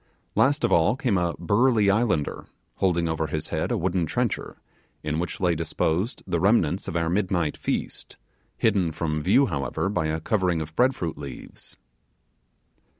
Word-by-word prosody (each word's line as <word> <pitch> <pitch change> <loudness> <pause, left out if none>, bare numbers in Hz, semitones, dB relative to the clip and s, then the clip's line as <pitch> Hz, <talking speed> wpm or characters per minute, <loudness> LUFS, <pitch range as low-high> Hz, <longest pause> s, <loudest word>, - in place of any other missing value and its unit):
Last 145 +2 +2
of - - +2
all 85 +7 +4
came 125 -5 0
a 85 -1 -1
burly 105 +3 +3
islander, 100 -9 0 0.3
holding 85 -3 +1
over 80 -1 -1
his 75 +1 -3
head - - -1
a - - +1
wooden 90 -2 0
trencher, - - -2 0.5
in 75 +1 -1
which 85 -1 -4
lay 90 -2 +2
disposed 85 +5 -1
the 85 -3 -1
remnants 95 -4 +2
of - - -4
our 85 -1 +1
midnight 90 -3 0
feast, - - -4 0.4
hidden 95 -7 +2
from 75 -1 -2
view, 105 - +4
however, 70 - -2
by 90 -6 0
a 80 +1 -1
covering 90 -1 0
of 80 0 -6
bread 130 +1 +3
fruit 85 -2 -4
leaves. 70 -4 -9
85 Hz, 160 wpm, -25 LUFS, 80-100 Hz, 0.5 s, all